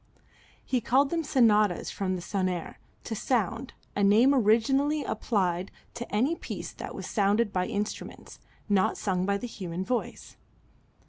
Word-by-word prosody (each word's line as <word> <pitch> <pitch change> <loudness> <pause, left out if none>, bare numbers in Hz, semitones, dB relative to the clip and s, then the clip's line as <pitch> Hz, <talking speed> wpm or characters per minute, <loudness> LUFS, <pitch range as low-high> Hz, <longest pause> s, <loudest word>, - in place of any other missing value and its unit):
He 255 -2 0
called 270 +5 +3
them 335 -1 0
sonatas 215 - +3
from 185 -2 -2
sonare, 180 -1 -3 0.3
to 230 - -5
sound, 230 +2 -1 0.2
a 200 - +1
name 225 +7 +6
originally 270 +6 +3
applied 185 -4 -1 0.2
to 240 0 -7
any 255 +11 +2
piece - - -6
that - - -8
was - - -6
sounded 205 +1 +1
by 180 0 0
instruments, 210 -1 -5 0.3
not 200 -3 +2
sung 185 -2 -1
by 200 0 +2
the 225 - -6
human 185 -6 -5
voice. 245 +3 -4
210 Hz, 140 wpm, -28 LUFS, 190-250 Hz, 0.3 s, name